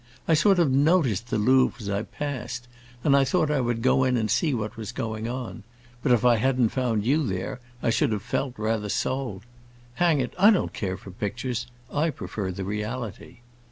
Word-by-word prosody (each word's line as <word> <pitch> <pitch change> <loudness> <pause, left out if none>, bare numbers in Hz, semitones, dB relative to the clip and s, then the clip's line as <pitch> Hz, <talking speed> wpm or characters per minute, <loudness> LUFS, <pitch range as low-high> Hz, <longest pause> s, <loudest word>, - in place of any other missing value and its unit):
I 165 - +4
sort 195 +5 +4
of 165 -6 +3
noticed 135 - +2
the - - 0
Louvre 130 +6 +3
as 105 - -7
I 100 0 0
passed, 120 +1 -5 0.4
and 140 - +4
I 140 - +5
thought 150 +2 +1
I 145 -3 +2
would 120 -2 -1
go 130 0 +4
in 130 -1 +2
and 110 -3 0
see 160 - +2
what 110 -4 -3
was 110 -3 -6
going 110 0 -4
on. 125 0 -5 0.4
But 130 - +1
if 120 0 +4
I 120 -2 +6
hadn't 125 0 +2
found 115 -5 -1
you 150 +6 +3
there 95 +1 -3 0.2
I 115 - +2
should 115 - +2
have 105 -2 -2
felt 125 +2 -2
rather 110 -1 -1
sold. 120 -5 -2 0.6
Hang 170 -4 +4
it, 125 - -2
I 200 +3 +8
don't 210 -5 +2
care 95 -2 -3
for 95 - -11
pictures; 120 +4 -3 0.3
I 155 +3 +2
prefer 105 -9 -4
the 95 +1 -5
reality!" 105 +2 -5
120 Hz, 200 wpm, -26 LUFS, 110-135 Hz, 0.6 s, I